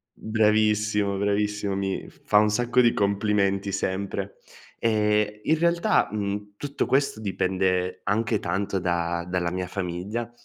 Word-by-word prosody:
Bravissimo, 105 -2 +1
bravissimo, 105 0 0
mi 95 -1 -3
f - - -19
fa 105 - +4
un 105 0 +4
sacco 120 +3 +2
di 120 -1 +5
complimenti 100 -1 +1
sempre. 100 +1 -3 0.4
Ehm, 105 -1 +1
in 160 +1 +2
realtà, 170 +5 +2
mhmm, 105 0 -3
tutto 145 +3 -3
questo 135 -5 +1
dipende 95 -2 0
anche 110 +1 +1
tanto 95 +2 -2
da 85 -1 -1
dalla 90 -1 -1
mia 90 0 -3
famiglia. 95 +5 -4
100 Hz, 130 wpm, -25 LUFS, 95-110 Hz, 0.4 s, di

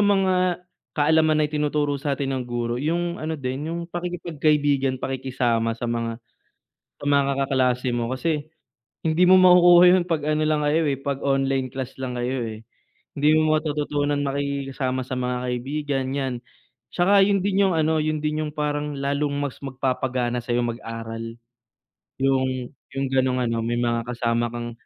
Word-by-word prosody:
mga 190 -3 +2 0.4
kaalaman 155 +1 +3
na 155 - +3
itinuturo 150 -1 0
sa 140 -1 -1
atin 135 0 -2
ng 130 -1 -2
guro, 120 0 -2
yung 170 +4 -1
ano 160 +1 -3
din, 135 +2 -4
yung 170 0 -3
pakikipagkaibigan, 150 -6 0
pakikisama 125 -4 -1
sa 120 - -6
mga 115 -1 -2 0.8
sa - - -8
mga 140 -1 +3 0.2
kaklase 130 -1 +1
mo 120 0 -2
kasi, 150 +3 -1 0.6
hindi 165 +2 +2
mo 185 +1 +7
makukuha 180 -1 +7
yun 180 0 +4
'pag 165 -3 -1
ano 155 0 +1
lang 155 -1 +1
kayo, 150 +2 +2
eh, 135 - -2
'pag 140 -1 -3
online 135 -2 0
class 130 -1 -6
lang 125 -2 -4
kayo, 125 +2 -1 0.2
eh. 110 - -10 0.5
Hindi 145 +1 +1
mo 155 0 +3
matututunan 145 -1 -1
makisama 135 -2 -2
sa 130 - -9
mga 125 0 -1 0.2
kaibigan, 135 +1 -2
'yan. 135 -3 -1 0.6
'Tsaka 195 +3 +5
yun 195 -1 +3
din 200 0 +2
yung 180 - 0
ano, 160 0 +2
yun 155 0 -1
din 150 0 0
yung 150 - -6
parang 150 -1 -2
lalong 140 +1 -1
mas 145 -2 -3
magpapagana 130 -2 -2
sayo 120 0 -1
mag-aral. 115 -1 -6 0.8
Yung 130 -2 0 0.2
yung 135 -1 -2
gano'ng 130 -1 +1
ano, 115 -1 -1
may 115 +1 -1
mga 120 -1 0
kasama 120 -1 0
kang 120 0 -6
140 Hz, 160 wpm, -23 LUFS, 125-155 Hz, 0.8 s, mo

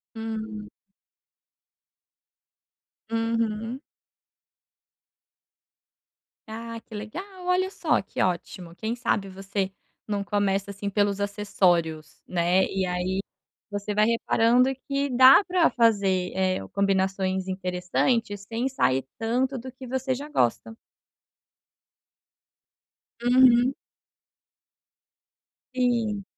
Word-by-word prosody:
Hum. 220 -1 -5 2.4
Uhum. 225 +1 -1 2.7
Ah, 230 +1 -6
que 220 - -15
legal, 215 - -6 0.2
olha 365 +1 +1
só, 325 -5 +1
que 195 - -3
ótimo. 175 -1 -3
Quem 225 +5 -3
sabe 210 -5 -1
você 195 0 -3 0.4
num 200 -1 -1
começa, 200 -1 0
assim, 200 +1 -5
pelos 200 0 +1
acessórios, 175 -6 0
né. 175 +1 +2
E 190 -1 0
aí, 180 +2 -1 0.5
você 205 +1 -3
vai 210 0 +4
reparando 235 +2 +3 0.2
que 280 0 -1
dá 260 +7 +8
para 360 -2 +3
fazer, 200 -6 +2
eh, 185 -1 +1
combinações 190 -1 0
interessantes, 190 +4 -1
sem 235 +4 -2
sair 130 - +1
tanto 255 +4 0
do 255 +2 -8
que 255 0 -11
você 260 +1 -1
já 280 +3 -6
gosta. 225 - 0 2.5
Uhum. 250 +1 +5 2.0
Sim. 230 -5 0
210 Hz, 90 wpm, -26 LUFS, 190-245 Hz, 2.7 s, dá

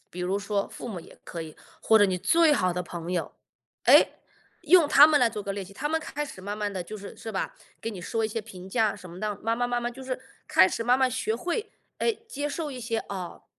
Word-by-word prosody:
比 180 - -10
如 180 +2 0
说 200 0 -1
父 - - -8
母 200 -6 -5
也 - - -14
可 170 - -7
以， 155 -1 -10 0.3
或 220 - +5
者 205 - +7
你 185 -2 0
最 330 - +4
好 185 -10 +2
的 180 +1 -2
朋 175 0 -6
友， 175 -2 -2 0.5
诶， - - +7 0.5
用 330 0 +6
他 290 0 +9
们 305 -2 +4
来 235 -2 +4
做 210 -2 -5
个 200 -1 -3
练 200 -1 -4
习。 195 - -13
他 295 - -3
们 320 +1 +1
开 295 -1 -4
始 185 -9 -10
慢 205 +2 -4
慢 210 -1 -2
地 185 -2 -4
就 215 +5 -8
是 200 - -10
是 225 - -7
吧？ 190 - -3 0.2
给 225 - -3
你 200 - -8
说 225 +6 -2
一 - - 0
些 225 +1 -3
评 190 -4 -11
价 220 -1 +2
什 185 -3 -11
么 175 +2 -10
的， 210 -1 -3
慢 225 +1 +1
慢 245 0 0
慢 240 0 +1
慢 240 - -1
就 260 +2 -10
是 255 0 -3 0.3
开 185 - +6
始 230 - -3
慢 250 +2 +4
慢 260 -1 +3
学 220 -1 -1
会， 350 - -3 0.3
诶， 455 -1 -1
接 290 -6 -3
受 300 0 -3
一 255 - -7
些， 230 -2 -2
哦， 185 -3 -6
220 Hz, 285 characters per minute, -27 LUFS, 190-260 Hz, 0.5 s, 他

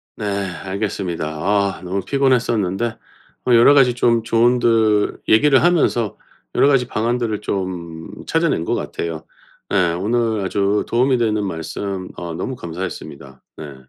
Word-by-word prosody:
네 - - -5
알겠습니다. 95 -3 -3
아 100 +6 0
너무 95 +2 -2
피곤했었는데 120 -6 +1 0.6
어 125 - +4
여러 120 +5 +7
가지 130 -4 +5
좀 120 -1 +2
조언들 115 -2 +2
얘기를 135 +6 +5
하면서 150 - +2 0.4
여러 - - +4
가지 130 -4 +3
방안들을 115 -1 -1
좀 90 -5 -4 0.2
찾아낸 165 - +1
것 - - 0
같아요. 80 -1 -4 0.5
예. 90 -4 +2
오늘 110 +3 0
아주 100 +2 0
도움이 125 +2 +2
되는 105 -3 0
말씀 95 +2 -5
어 85 -1 -5
너무 130 +10 -4
감사했습니다. 80 -6 -7 0.2
네. 75 -3 -8
105 Hz, 295 characters per minute, -20 LUFS, 90-120 Hz, 0.6 s, 여러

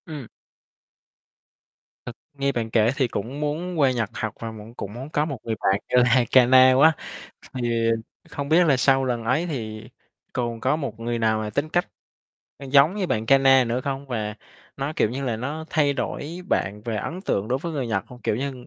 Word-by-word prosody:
Ừm. 150 -7 -7 1.8
Thực 125 - -7 0.2
nghe 140 0 0
bạn 115 -3 -3
kể 110 +1 +3
thì 135 -3 +1
cũng 120 +6 -5
muốn 160 +4 -3
qua 135 -3 +4
Nhật 115 -5 -1
học 110 -3 -3
và 115 -1 -5
mẫn 110 +1 -11
cũng 100 -4 -7
muốn 130 +5 -7
có 150 -1 0
một 140 -4 -4
người 115 -1 -2
bạn 95 +1 +2
như 125 0 +5
Haikana 130 +1 +6
quá. 155 +4 +6 0.6
Thì 120 -2 0 0.4
không 140 0 -5
biết 170 +4 +5
là 140 -4 +4
sau 135 +1 +3
lần 120 -3 -2
ấy 135 +9 +1
thì 110 -9 -5 0.4
còn 120 -2 -3
có 130 +6 +1
một 125 -8 -5
người 120 0 -2
nào 110 -1 +2
mà 105 -1 -4
tính 145 +8 -1
cách, 175 +3 0 0.7
ơ, 140 - -10
giống 145 +6 +5
như 195 -3 -1
bạn 110 -7 -1
Kana 135 0 +5
nữa 120 +1 -1
không? 135 +1 -4
Và 110 -5 -3 0.4
nó, 140 +2 -3
kiểu 110 - +2
như 135 +3 -4
là, 120 -4 -1
nó 145 +7 -4
thay 145 -2 +2
đổi 150 +5 -4
bạn 105 +2 -1
về 115 -2 -2
ấn 165 - -4
tượng 105 - -1
đối 130 +2 0
với 170 +4 -5
người 140 -5 -2
Nhật 95 -5 -1
hông? 125 0 -13
Kiểu - - 0
như, 130 -1 -5
130 Hz, 205 wpm, -24 LUFS, 115-140 Hz, 1.8 s, Haikana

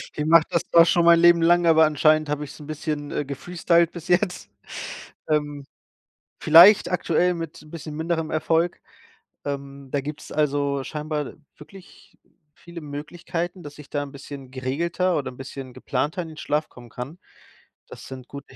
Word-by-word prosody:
Ich 150 - -2
mache 160 0 +6
das 170 - +2
doch 165 -1 +8
schon 170 0 +3
mein 170 0 +7
Leben 175 0 +6
lang, 175 +1 +4
aber 160 -1 +6
anscheinend 155 0 +3
habe 150 0 -2
ich's 145 +2 -10
'n 145 - -11
bisschen, 150 -1 -4
äh, 145 - -2
gefreestylt 170 +4 +1
bis 170 0 -10
jetzt. 180 +1 0 0.8
Ähm, 145 -2 -1 0.8
vielleicht 175 +6 +7
aktuell 180 0 +1
mit 165 -2 -7
'n 155 - -16
bisschen 155 -2 -8
minderem 160 0 -2
Erfolg, 165 +2 0 0.7
ähm, 140 -1 -6
da 140 - 0
gibt's, 150 +2 -8
also, 140 -2 0
scheinbar 150 -1 -4 0.2
wirklich 185 +5 -16 0.4
viele 170 -1 -11
Möglichkeiten, 170 +4 -5
dass 145 0 -10
ich 150 -2 -13
da 145 - -1
'n 140 - -9
bisschen 140 -1 -10
geregelter 170 +8 -1
oder 140 - -3
'n 125 - -16
bisschen 135 -1 -8
geplanter 150 +6 -2
in 160 - -9
den 155 - -12
Schlaf 150 +1 -1
kommen 120 -1 -14
kann. 135 +10 -8 0.7
Das - - -11
sind 130 -2 -9
gute 140 -1 -11
155 Hz, 170 wpm, -24 LUFS, 145-170 Hz, 0.8 s, doch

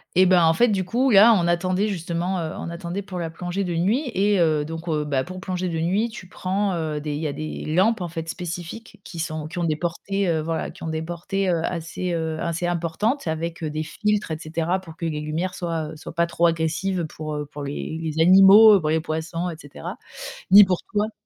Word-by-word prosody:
Eh 185 - +6
ben, 180 -2 +5
en 165 0 +5
fait, 240 0 +4
du 190 -3 0
coup, 250 +7 +1
là, 215 +3 +8
on 170 - 0
attendait 185 +4 +1
justement, 175 0 -2
heu, 160 -1 -4
on 170 - -5
attendait 175 +3 -5
pour 185 -2 -6
la 165 -1 -3
plongée 175 +4 -3
de 175 -2 -2
nuit 225 - +1
et 200 0 +3
heu, 155 -3 +2
donc, 165 +2 -7
heu, 150 -1 0
bah, 135 -3 0
pour 185 +1 -8
plonger 185 -1 -3
de 165 - -3
nuit, 195 +8 +1
tu 205 -5 -10
prends, 190 +2 -1
heu, 155 -3 -2
des 150 0 -4
il 145 - -3
y 155 - -1
a 140 - -3
des 155 +1 -5
lampes, 190 +7 +2
en 175 - -2
fait, 165 -1 -6
spécifiques 175 +6 -7
qui 170 - -9
sont 155 -1 -3
qui 175 +3 -6
ont - - 0
des 155 - +1
portées, 180 +4 -2
heu, 160 -2 +1
voilà, 165 +1 -3
qui - - -17
ont 160 - -4
des 160 0 -2
portées, 180 +3 -2
heu, 170 -2 +1
assez 175 +1 -3
heu, 160 -1 -2
assez 170 +1 -2
importantes 175 - -1
avec, 165 +1 -3
heu, 155 - -2
des 155 +1 -3
filtres, 210 +2 -1
et 155 - -3
cetera, 165 +4 -1
pour 165 -3 -13
que 170 - -4
les 150 -2 -2
lumières 165 +5 -2
soient, 165 -4 -3
heu, 160 - -9
soient 155 - -10
pas 170 - +3
trop 170 0 +2
agressives 165 +2 -1
pour, 155 0 -6
heu, 150 0 -3
pour 145 0 -9
les 145 +3 -4
les 160 -1 -3
animaux, 195 +3 +8
pour 155 -2 -2
les 160 0 +1
poissons, 165 +2 -3
et 160 - -9
cetera, 140 - -8 0.6
ni 205 +1 +11
pour 185 -2 +1 0.2
toi. 210 +1 0
170 Hz, 245 wpm, -23 LUFS, 160-190 Hz, 0.6 s, ni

